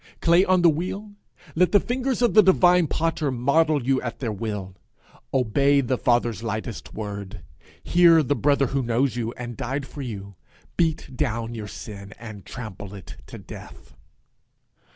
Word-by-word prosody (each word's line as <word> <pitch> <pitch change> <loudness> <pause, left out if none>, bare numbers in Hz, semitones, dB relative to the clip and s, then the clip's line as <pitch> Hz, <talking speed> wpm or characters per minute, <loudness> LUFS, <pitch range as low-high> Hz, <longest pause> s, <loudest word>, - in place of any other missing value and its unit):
Clay 170 +2 +4
on 185 -2 +3
the - - +7
wheel, 190 +6 -5 0.4
let 180 +1 +3
the 205 - +7
fingers 255 +2 -1
of 240 - +3
the 215 - +8
divine 180 -3 +4
potter 160 -2 -1
model 140 +4 +2
you 135 0 +2
at 120 -1 -5
their 120 -5 -3
will. 105 -3 -5 0.6
Obey 140 +3 +3
the 130 -1 0
Father's 120 -4 +1
lightest 110 -1 -5
word; 100 -5 -6 0.4
hear 170 -2 +5
the 145 +1 0
Brother 140 +2 +2
who 135 - +1
knows 120 +1 0
you, 115 -1 -2
and 120 -1 -7
died 135 +3 -3
for 145 - -9
you; 100 -6 -6 0.4
beat 160 -5 -1
down 115 -4 -2
your 110 -2 -6
sin, 100 0 -9
and 110 -4 -10
trample 105 -5 -8
it 95 - -11
to - - -9
death. - - -12
130 Hz, 160 wpm, -24 LUFS, 110-160 Hz, 0.6 s, the